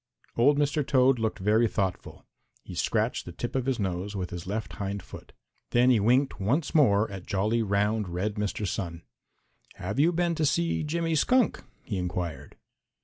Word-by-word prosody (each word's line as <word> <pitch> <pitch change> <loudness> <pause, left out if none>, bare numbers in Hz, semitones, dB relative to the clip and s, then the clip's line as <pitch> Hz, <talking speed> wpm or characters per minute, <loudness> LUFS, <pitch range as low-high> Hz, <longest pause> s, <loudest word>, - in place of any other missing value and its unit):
Old 140 +5 +4
Mr. 145 +1 +1
Toad 130 -2 +3
looked 110 -1 -1
very 110 +4 +3
thoughtful. 95 -3 -3 0.4
He - - -9
scratched - - 0
the 90 - -7
tip 120 +9 -5
of 130 -1 -1
his 135 -3 +1
nose 95 +1 -3
with 90 -2 -4
his 90 +1 -6
left 105 +3 -4
hind 100 -1 -3
foot. - - -12 0.4
Then 125 +2 +4
he 120 - +4
winked 125 +6 +2
once 135 - 0
more 110 -9 +4
at 95 -2 -8
jolly, 105 +4 +1
round, 105 0 0
red 95 +5 -2
Mr. 105 +1 -2
Sun. 85 -4 -4 0.7
"Have 100 +8 -4
you 160 +4 +5
been 175 0 +1
to 160 -1 -1
see 170 +3 +1
Jimmy 165 +2 -1
Skunk?" 250 - +2 0.2
he 100 -5 -3
inquired. 85 -5 -4
110 Hz, 175 wpm, -27 LUFS, 95-135 Hz, 0.7 s, you